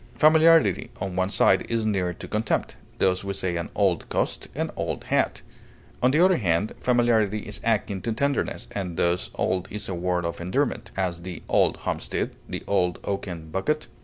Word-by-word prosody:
Familiarity, 160 - +5
on 95 -1 -3
one 95 0 +1
side, 95 -1 +4
is 115 -1 0
near 95 -4 +1
to 90 - -9
contempt; 105 0 -1 0.2
thus 95 0 +2
we 100 0 -3
say, 95 -2 -1
an 85 - -3
old 95 -5 +1
coat, - - -1
an - - -2
old - - -3
hat. - - 0 0.6
On 125 - +5
the 150 +5 +3
other 185 -2 +4
hand, 95 +1 +1
familiarity 115 -4 +2
is - - -5
akin 105 -4 0
to 115 - -2
tenderness, 140 +5 -1
and 90 -4 -4
thus 85 +1 +1
old 90 -1 0
is 105 0 -4
a 95 - -3
word 90 0 -1
of 85 +1 -4
endearment; 115 +12 -1
as, 90 -3 -1
"the 90 -1 -7
old - - +3
homestead," - - -2 0.2
the - - -4
"old 90 -3 +1
oaken 90 -5 -4
bucket." 150 - -1
95 Hz, 180 wpm, -25 LUFS, 90-115 Hz, 0.6 s, Familiarity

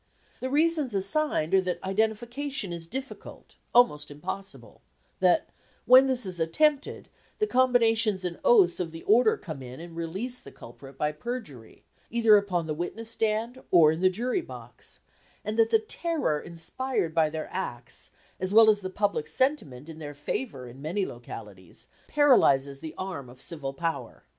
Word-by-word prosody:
The 260 - -3
reasons 300 -4 +1
assigned 195 - 0
are 190 - +6
that 180 -1 -2
identification 220 +3 -1
is 165 -1 -7
difficult, 265 +7 -8
almost 240 -12 +4
impossible; 190 +7 -8 0.4
that, - - +3 0.4
when 260 +2 +8
this 255 -4 0
is 180 -2 -5
attempted, 285 - +1 0.3
the 425 - +2
combinations 230 - +2
and 175 -1 -4
oaths 450 -7 +5
of 170 -3 -3
the 165 0 -9
order 225 +1 +4
come 155 -7 -8
in 130 +1 -9
and 170 0 -10
release 190 +10 -4
the - - -13
culprit 135 +3 -13
by 150 +1 0
perjury, 150 - -8 0.3
either 230 -2 +5
upon 190 -5 +1
the 155 - -2
witness 220 +8 -5
stand 225 +3 -1
or 160 -4 +6
in 160 +2 -3
the 185 - +5
jury 245 - -1
box; - - -11 0.4
and 215 +1 -2
that 225 0 +5
the 225 - +5
terror 220 - -2
inspired 170 +3 -3
by 160 -2 +3
their 155 0 -5
acts, 125 -11 -4 0.3
as 185 +2 -1
well 220 -1 +9
as 205 -1 -2
the 185 - -4
public 200 -5 -1
sentiment 150 - -1
in 160 -1 -9
their 145 -2 -7
favour 145 - -4
in 125 +3 -12
many 180 +7 -1
localities, 105 - -10 0.2
paralyzes 140 - +4
the 155 +1 -8
arm 180 -9 -5
of 125 +1 -15
civil 145 -3 -3
power. 165 +4 -4
190 Hz, 160 wpm, -27 LUFS, 155-240 Hz, 0.4 s, well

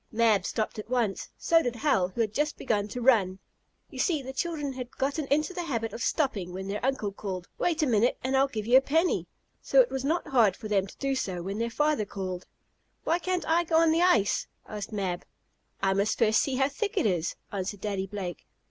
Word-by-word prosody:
Mab 220 -4 +3
stopped 215 0 -2
at 215 - -8
once. 235 -6 0
So 330 -1 +4
did 245 -5 -2
Hal, 225 -8 +2
who 190 +6 -3
had 215 -2 0
just 295 +4 0
begun 205 -5 0
to 245 +3 -5
run. 205 -7 +4 0.5
You 265 - -8
see 300 +1 +1
the 265 +1 -6
children 295 -1 -2
had 250 -1 -8
gotten 280 +2 -1
into 305 +5 +1
the 355 - -3
habit 230 -7 -2
of 235 - -6
stopping 225 - 0
when 190 +1 -5
their 205 +3 -4
uncle 255 -6 0
called: 190 -3 -5
"Wait 335 -2 +1
a - - +4
minute 235 -2 +2
and 260 +1 0
I'll 270 +1 +4
give 215 -5 -4
you 245 +3 +6
a - - +6
penny," 320 +6 +1 0.3
so - - +3
it - - +5
was 265 -1 -2
not 320 +5 0
hard 225 -8 +4
for 215 - -7
them 200 -2 +1
to - - -14
do 275 0 -1
so 185 -9 -2
when 195 +3 -4
their 230 0 0
father 295 -2 +1
called. 185 -2 -5 0.6
"Why 335 - +1
can't 365 0 -2
I 335 +2 +3
go 330 -1 -1
on 330 -1 +5
the 330 +2 +2
ice?" 230 - +3 0.2
asked 210 0 -6
Mab, 190 -4 -2 0.6
"I 195 0 +3
must 200 +2 +1
first 220 -1 +4
see 270 - -1
how 270 +1 +3
thick 405 +8 -3
it - - +2
is," 175 -5 0 0.2
answered 200 0 -4
Daddy 195 -2 -2
Blake. 190 -3 -6
235 Hz, 230 wpm, -28 LUFS, 200-290 Hz, 0.6 s, you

